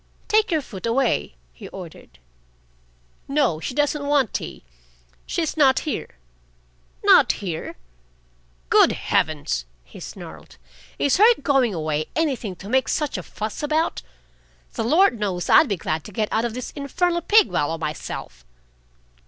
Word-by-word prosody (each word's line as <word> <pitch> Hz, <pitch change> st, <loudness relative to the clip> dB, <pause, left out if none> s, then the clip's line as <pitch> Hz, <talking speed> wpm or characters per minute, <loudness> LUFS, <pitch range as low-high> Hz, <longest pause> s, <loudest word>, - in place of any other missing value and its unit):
"Take 435 Hz, 0 st, +3 dB
your 315 Hz, -5 st, 0 dB
foot 205 Hz, -3 st, -7 dB
away!" 230 Hz, -, 0 dB, 0.2 s
he 65 Hz, -, -11 dB
ordered. -, -, -11 dB, 1.1 s
"No. 275 Hz, -, +1 dB
She 245 Hz, -, -5 dB
doesn't 290 Hz, 0 st, 0 dB
want 285 Hz, -6 st, +2 dB
tea. -, -, -5 dB, 0.6 s
She's 325 Hz, -3 st, -2 dB
not 270 Hz, -4 st, +4 dB
here." 300 Hz, -, -5 dB, 0.9 s
"Not -, -, +6 dB
here!" 175 Hz, -6 st, -5 dB, 1.0 s
"Good -, -, +6 dB
heavens!" 145 Hz, -, -1 dB, 0.2 s
he -, -, -14 dB
snarled. -, -, -10 dB, 0.4 s
"Is 285 Hz, -, +2 dB
her 450 Hz, +4 st, +7 dB
going 260 Hz, -8 st, +2 dB
away 155 Hz, -1 st, -2 dB
anything 265 Hz, -, -1 dB
to 190 Hz, -, -11 dB
make 260 Hz, +4 st, +2 dB
such 300 Hz, -3 st, -1 dB
a -, -, -3 dB
fuss 215 Hz, 0 st, -6 dB
about? 310 Hz, +2 st, 0 dB, 0.7 s
The -, -, -2 dB
Lord 310 Hz, -, +3 dB
knows 190 Hz, -4 st, -2 dB
I'd 315 Hz, -, +6 dB
be 200 Hz, -, 0 dB
glad 155 Hz, -1 st, -3 dB
to -, -, -9 dB
get 215 Hz, -2 st, -1 dB
out 225 Hz, +2 st, +1 dB
of 235 Hz, -1 st, -3 dB
this 250 Hz, -, -5 dB
infernal 340 Hz, +5 st, -1 dB
pig 425 Hz, +3 st, +4 dB
wallow 160 Hz, +3 st, 0 dB
myself." 150 Hz, -, -6 dB
250 Hz, 145 wpm, -23 LUFS, -, 1.1 s, her